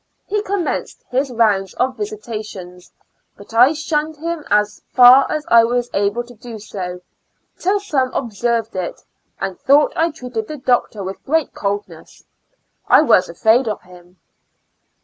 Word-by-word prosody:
He 420 +1 -1
commenced 395 -4 -3
bis 265 +2 0
rounds 210 -5 +1
of 255 +1 0
visitation, 215 - -7 0.6
but 205 +2 -14
I 250 +6 +6
sbunned 310 0 -2
bim 335 -1 -4
as 210 0 +1
far 250 +2 +7
as 305 -1 -2
I 230 -1 +6
was 245 +1 -1
able 205 +4 0
to 245 0 -14
do 235 0 -10
so, 180 -4 -7 0.6
till 395 +3 +1
some 280 -11 -1
observed 230 -2 -2
it, 185 -2 -4 0.4
and 195 -1 -4
tbougbt 285 +2 +4
I 330 +1 +2
treated 250 -8 -6
tbe 300 -4 -9
doctor 240 -4 +1
witb 190 0 -6
ofreat 320 +1 0
coldness. 205 0 -5 0.6
I - - +6
was 205 -10 +3
afraid 225 +8 +2
of 210 - -3
bim. 180 0 -17
240 Hz, 150 wpm, -19 LUFS, 205-295 Hz, 0.6 s, far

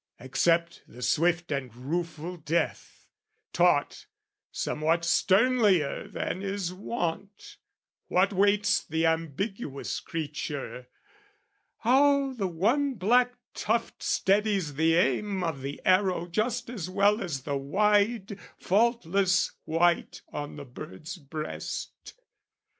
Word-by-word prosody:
Accept 170 +6 +1
the 125 +2 -10
swift 170 +6 +1
and 130 -5 -3
rueful 165 +5 -4
death, 165 0 -3 0.5
Taught, - - +2 0.4
somewhat 165 +2 0
sternlier 200 - +3
than 185 - -3
is 195 -2 -3
wont, 200 - -5 0.5
what 195 +3 +2
waits 200 +1 +3
The 160 +1 -1
ambiguous 165 - -2
creature, 145 -5 -5 0.9
how 275 +2 +4
the 205 -6 -2
one 240 - +1
black 245 +5 +3 0.2
tuft 230 +2 -1
Steadies 195 -5 +1
the 160 +3 +3
aim 185 +5 +1
of 160 -5 -2
the 140 +1 -5
arrow 185 -2 +3
just 215 +7 -1
as 205 -8 -5
well 205 +3 +3
As 150 -9 -4
the 140 0 -2
wide 205 +6 +1 0.2
faultless 200 -3 +2
white 170 +2 +1
on 145 0 -5
the 145 -1 -8
bird's 155 +7 -9
breast. 155 0 -6
180 Hz, 105 wpm, -28 LUFS, 160-210 Hz, 0.9 s, how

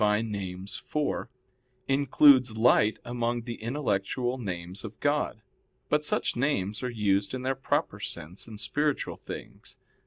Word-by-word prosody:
Nom. 105 +1 +2
iv) 95 -2 -4 1.2
includes 135 -3 +5
Light 110 -2 +4
among 120 0 -1
the 115 -1 -6
intellectual 120 0 -1
names 90 -3 -5
of 110 0 -8
God. 145 -7 0 0.5
But 150 0 +2
such - - 0
names 115 -6 0
are 125 - -1
used 100 -1 +1
in 130 - -5
their 130 +1 +1
proper 135 0 -1
sense 85 +9 -6
in 110 -2 -9
spiritual 140 +8 0
things. - - -9
115 Hz, 130 wpm, -28 LUFS, 100-130 Hz, 1.2 s, includes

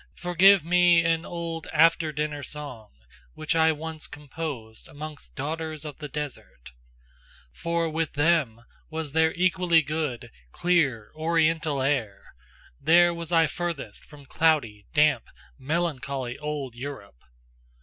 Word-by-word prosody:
Forgive 180 +1 +5
me 175 -1 +5
an 165 0 +1
old 165 -2 -5
after 165 0 +4
dinner 150 -1 -3
song, 130 -6 -8 0.5
which 155 +2 -1
I 160 0 +5
once 155 0 -6
composed 140 -6 -7
amongst 150 0 -9
daughters 155 +1 -4
of 150 -1 -8
the 150 - -5
desert: 145 - -7 0.8
For 170 - -1
with 160 -1 -2
them 145 -7 +1 0.3
was 160 -2 -4
there 160 +1 +3
equally 180 -2 +3
good, 145 -6 -3 0.2
clear, 140 - +1
Oriental 160 -3 +1
air; 130 -8 -2 0.5
there 175 +1 +5
was 170 0 -6
I 165 -1 +5
furthest 170 -2 -4
from 145 -2 -15
cloudy, 135 -10 +1
damp, 150 -2 +3 0.3
melancholy 140 -5 -2
Old 150 -4 -4
Europe! 120 - -8
155 Hz, 120 wpm, -26 LUFS, 140-165 Hz, 0.8 s, Forgive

